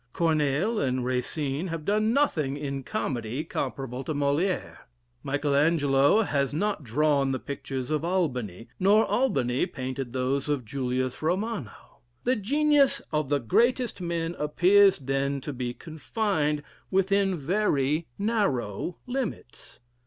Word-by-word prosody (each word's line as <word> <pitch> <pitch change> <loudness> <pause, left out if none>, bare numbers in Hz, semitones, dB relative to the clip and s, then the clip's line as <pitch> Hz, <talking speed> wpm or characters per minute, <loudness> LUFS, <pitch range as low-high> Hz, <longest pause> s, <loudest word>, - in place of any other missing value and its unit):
Corneille 160 +6 +1
and 130 -2 0
Racine 135 +5 -2
have 165 -3 -5
done 215 +3 +2
nothing 155 - +1
in 140 -2 -4
comedy 130 - -3
comparable 135 -5 -4
to 155 - -2
Molière: 145 +7 0 0.4
Michael 145 +1 -1
Angelo 145 +4 +4
has 140 -6 -1
not 205 -1 -1
drawn 140 +2 +2
the 130 - 0
pictures 135 -1 -5
of 155 0 0
Albani, 125 - -2
nor 205 +4 +5
Albani 135 - +1
painted 130 -1 -5
those 130 +3 -1
of 140 -5 -1
Julius 130 +1 -2
Romano. 180 - -3 0.2
The 255 +2 +2
genius 285 +5 +3
of 150 -3 0
the 145 -1 +2
greatest 235 - +1
men 170 -1 -2
appears 190 +6 +5
then 135 +1 -1
to 145 - -5
be 125 -1 -3
confined 155 - -2 0.3
within 195 0 +2
very 155 -3 0
narrow 180 - -1
limits. 245 - -5
150 Hz, 125 wpm, -27 LUFS, 135-195 Hz, 0.4 s, nor